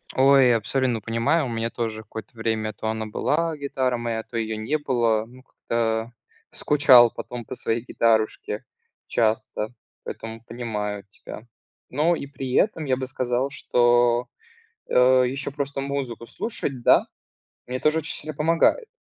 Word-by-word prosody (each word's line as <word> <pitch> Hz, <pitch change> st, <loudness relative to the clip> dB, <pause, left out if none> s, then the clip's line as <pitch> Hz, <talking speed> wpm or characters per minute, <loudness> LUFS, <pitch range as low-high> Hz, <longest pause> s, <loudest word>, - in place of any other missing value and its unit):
Ой, 135 Hz, -2 st, +6 dB
абсолютно 120 Hz, +1 st, 0 dB
понимаю, 115 Hz, +9 st, +1 dB
у -, -, -4 dB
меня 115 Hz, 0 st, -2 dB
тоже 110 Hz, -2 st, -4 dB
какое-то 110 Hz, +2 st, -10 dB
время 110 Hz, -1 st, -1 dB
то 110 Hz, -, -5 dB
она 110 Hz, 0 st, -2 dB
была, 160 Hz, +8 st, 0 dB
гитара 130 Hz, -3 st, -1 dB
моя, 115 Hz, -1 st, -3 dB
то 115 Hz, -, -7 dB
ее 110 Hz, -1 st, -2 dB
не 110 Hz, +8 st, -1 dB
было. 120 Hz, -6 st, +1 dB
Ну, 125 Hz, +3 st, -16 dB
как-то. 115 Hz, -2 st, -2 dB, 0.4 s
Скучал 130 Hz, -5 st, +6 dB
потом 120 Hz, 0 st, -7 dB
по -, -, -7 dB
своей 115 Hz, +1 st, -1 dB
гитарушке 115 Hz, -3 st, 0 dB, 0.4 s
часто, 110 Hz, 0 st, -1 dB, 0.3 s
поэтому 115 Hz, 0 st, -7 dB
понимаю 105 Hz, -4 st, -4 dB
тебя. 105 Hz, +3 st, -11 dB, 0.4 s
Но 155 Hz, +6 st, +2 dB
и 140 Hz, -, -6 dB
при 130 Hz, -2 st, -6 dB
этом 165 Hz, -1 st, +2 dB
я 130 Hz, -2 st, +2 dB
бы 130 Hz, 0 st, -4 dB
сказал, 130 Hz, 0 st, -1 dB
что, 120 Hz, -4 st, +2 dB, 0.6 s
э, -, -, -2 dB, 0.3 s
еще 135 Hz, +2 st, -4 dB
просто 140 Hz, -1 st, -3 dB
музыку 135 Hz, -4 st, -4 dB
слушать, 140 Hz, -, -4 dB
да, -, -, +5 dB, 0.6 s
мне 125 Hz, +1 st, -4 dB
тоже 155 Hz, +1 st, +2 dB
очень 155 Hz, -, -3 dB
сильно 155 Hz, -, -7 dB
помогает. 165 Hz, -, +2 dB
120 Hz, 150 wpm, -24 LUFS, 115-140 Hz, 0.6 s, Ой